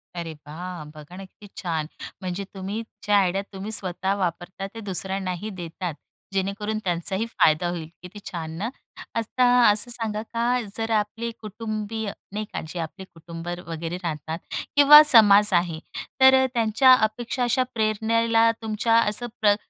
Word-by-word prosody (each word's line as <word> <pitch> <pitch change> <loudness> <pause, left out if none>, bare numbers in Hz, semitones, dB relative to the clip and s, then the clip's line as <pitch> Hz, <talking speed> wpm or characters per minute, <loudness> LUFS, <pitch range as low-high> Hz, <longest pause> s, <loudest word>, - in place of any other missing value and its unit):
अरे 170 -2 -5
वाह! 175 +2 -7
बघा 150 +3 -12
ना, 195 - -8
किती 205 +2 -16
छान! 160 -4 -2 0.3
म्हणजे 185 +1 -4
तुम्ही 195 +3 -4 0.2
ज्या 205 0 +4
आयडियात 195 0 +1
तुम्ही 195 +3 -6
स्वतः 190 -2 -1
वापरता 185 +1 -3
ते - - -6
दुसऱ्यांनाही 190 0 -3
देतात. 175 -2 -5 0.4
जेणेकरून 200 +3 -2
त्यांचाही 185 +4 -1
फायदा 175 -7 +2
होईल. 170 -3 -5
किती 180 +4 -10
छान 160 -3 -5
ना, 210 +6 -2 0.5
आता 230 +3 -1 0.3
असं 210 +3 +2
सांगा 220 -3 -3
का 240 +2 +1 0.2
जर 225 0 -2
आपले 220 +2 -1
कुटुंबीय 215 0 -4 0.2
नाही 215 +1 -3
का. - - -3
जे 170 +2 -6
आपले 170 +4 -6
कुटुंब 165 +1 -10 0.2
वगैरे 165 +1 -4
राहतात 160 0 -4 0.4
किंवा 290 +1 +10
समाज 210 -3 +7
आहे. 170 -2 +1 0.4
तर 265 0 +7
त्यांच्या 230 +2 +5
अपेक्षा 235 +2 0
अशा 255 +2 +2
प्रेरणेला 225 +1 +2
तुमच्या 220 +1 0
असं 230 +2 -1
प्र 205 -1 +5
205 Hz, 145 wpm, -24 LUFS, 175-225 Hz, 0.5 s, किंवा